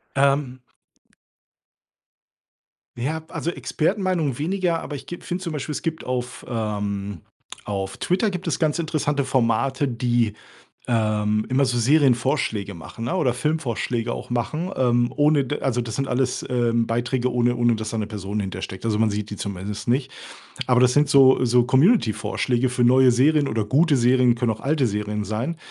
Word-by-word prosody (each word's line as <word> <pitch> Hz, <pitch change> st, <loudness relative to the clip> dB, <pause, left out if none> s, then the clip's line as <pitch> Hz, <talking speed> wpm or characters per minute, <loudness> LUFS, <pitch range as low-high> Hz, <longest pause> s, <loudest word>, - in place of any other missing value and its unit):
Ähm 135 Hz, -2 st, +1 dB, 2.4 s
Ja, 155 Hz, +7 st, -3 dB
also, 170 Hz, -, -3 dB
Expertenmeinungen 165 Hz, -, -1 dB
weniger. 175 Hz, +1 st, 0 dB
Aber 145 Hz, -, -6 dB
ich 135 Hz, -, -11 dB
gib 175 Hz, -, -8 dB
finde 180 Hz, +1 st, -4 dB
zum 170 Hz, -, -4 dB
Beispiel, 150 Hz, 0 st, -4 dB
es -, -, -4 dB
gibt 160 Hz, -1 st, -3 dB
auf, 125 Hz, -1 st, -4 dB
ähm, 105 Hz, -5 st, -3 dB, 0.4 s
auf 95 Hz, -2 st, -4 dB
Twitter 190 Hz, +4 st, 0 dB
gibt 180 Hz, -1 st, -6 dB
es -, -, -1 dB
ganz 155 Hz, -2 st, +1 dB
interessante 150 Hz, -3 st, -1 dB
Formate, 130 Hz, +2 st, +1 dB
die, 120 Hz, -3 st, 0 dB, 0.5 s
ähm, 105 Hz, -2 st, 0 dB
immer 130 Hz, +2 st, +2 dB
so 125 Hz, -2 st, +1 dB
Serienvorschläge 125 Hz, -5 st, +2 dB
machen, 100 Hz, +7 st, -8 dB
ne, 180 Hz, -, -1 dB
oder 135 Hz, -9 st, +1 dB
Filmvorschläge 125 Hz, -4 st, -2 dB
auch -, -, -7 dB
machen, 155 Hz, +9 st, -2 dB
ähm, 120 Hz, -1 st, +2 dB
ohne 145 Hz, -1 st, +3 dB
d 145 Hz, +3 st, -3 dB
also, 125 Hz, -2 st, 0 dB
das 115 Hz, -3 st, -3 dB
sind 135 Hz, 0 st, -2 dB
alles, 125 Hz, 0 st, -1 dB
ähm, 120 Hz, -2 st, +1 dB
Beiträge, 120 Hz, +2 st, -1 dB
ohne 120 Hz, 0 st, +1 dB
ohne 120 Hz, -1 st, +2 dB
dass 110 Hz, 0 st, -5 dB
da 115 Hz, -, -3 dB
'ne 105 Hz, -, -1 dB
Person 105 Hz, 0 st, -4 dB
hintersteckt. 95 Hz, 0 st, -6 dB
Also, 110 Hz, -2 st, 0 dB
man 110 Hz, -, +3 dB
sieht 105 Hz, 0 st, -4 dB
die 105 Hz, -, -6 dB
zumindest 100 Hz, +3 st, -5 dB
nicht. 130 Hz, +2 st, 0 dB, 0.6 s
Aber 125 Hz, -1 st, +4 dB
das 125 Hz, 0 st, +4 dB
sind 145 Hz, -1 st, +3 dB
so 130 Hz, -2 st, +6 dB
so 125 Hz, 0 st, +3 dB
Community-Vorschläge 130 Hz, -, +2 dB
für 125 Hz, -1 st, +1 dB
neue 130 Hz, 0 st, +6 dB
Serien 145 Hz, +4 st, +3 dB
oder 110 Hz, -1 st, -1 dB
gute 145 Hz, +5 st, +3 dB
Serien, 125 Hz, 0 st, +4 dB
können 120 Hz, -1 st, 0 dB
auch 110 Hz, -, -13 dB
alte 140 Hz, -3 st, +1 dB
Serien 105 Hz, 0 st, -3 dB
sein, 115 Hz, -, -3 dB
125 Hz, 170 wpm, -23 LUFS, 115-145 Hz, 2.4 s, so